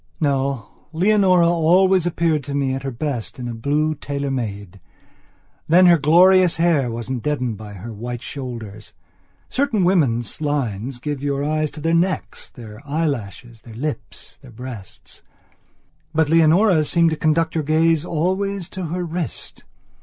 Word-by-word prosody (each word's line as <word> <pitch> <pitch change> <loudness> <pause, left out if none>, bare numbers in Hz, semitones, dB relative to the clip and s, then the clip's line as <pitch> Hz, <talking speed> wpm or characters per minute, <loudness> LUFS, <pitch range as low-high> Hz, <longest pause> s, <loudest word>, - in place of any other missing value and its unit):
No, 135 -6 -2
Leonora 185 -1 +4
always 175 +2 +3
appeared 165 -3 0
to 140 0 -4
me 135 -2 0
at 135 - -3
her 135 - -4
best 125 -2 -4
in 125 -1 -5
a 120 - -4
blue 145 +7 0
tailor 140 -1 -4
made. 100 -6 -5 0.9
Then 180 +4 +6
her 170 -2 +6
glorious 180 +4 +5
hair 165 -6 +2
wasn't 120 +2 -4
deadened 125 -6 -2
by 105 -1 -10
her 105 +4 -8
white 120 +2 -6
shoulders. 115 -6 -8 0.5
Certain 250 -8 0
women's 150 -9 +1
lines 130 -5 -2
guide 145 +2 -4
your 140 -1 -1
eyes 155 +1 0
to 150 - -10
their 165 +2 0
necks, 180 +3 -1
their 110 -2 -12
eyelashes, 120 - -4
their 115 -2 -13
lips, 150 +5 -6
their 135 - -14
breasts. 120 -4 -10 0.9
But 160 -1 +2
Leonora's 165 +1 +4
seemed 170 -1 +3
to - - 0
conduct 160 +1 +1
your 160 - -1
gaze 160 +1 +2
always 185 +3 -2
to 185 -1 -5
her 175 +2 -3
wrist. 165 - -6
150 Hz, 150 wpm, -21 LUFS, 125-165 Hz, 0.9 s, Then